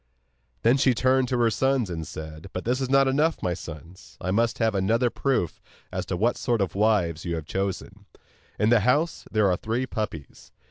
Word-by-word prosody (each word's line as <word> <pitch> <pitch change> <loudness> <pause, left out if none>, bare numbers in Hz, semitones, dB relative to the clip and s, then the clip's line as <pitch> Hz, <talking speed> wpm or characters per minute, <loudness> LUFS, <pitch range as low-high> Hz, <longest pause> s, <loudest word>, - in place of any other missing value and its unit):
Then 120 +4 +5
she 130 -2 +3
turned 130 +2 +2
to 125 0 0
her 115 -1 +3
sons 130 -1 +1
and 80 -3 -5
said: 80 +3 -8
'But 90 - -4
this 125 +3 0
is 130 - -2
not 135 0 +4
enough, 150 +5 +1
my 90 - +1
sons, 85 +1 -10
I 90 - -2
must 115 +3 +1
have 110 -2 +1
another 115 +5 +1
proof 130 - -1 0.3
as - - -4
to 90 - -2
what 115 +6 +1
sort 120 -3 0
of 95 -5 -1
wives 100 -6 +1
you 85 -1 -2
have 80 -2 -5
chosen. 95 +3 -4 0.5
In 105 - +2
the 120 - +6
house 135 - +1
there 105 -2 +3
are 90 -2 +2
three 115 +4 -2
puppies. 105 - -6
110 Hz, 200 wpm, -25 LUFS, 90-125 Hz, 0.5 s, the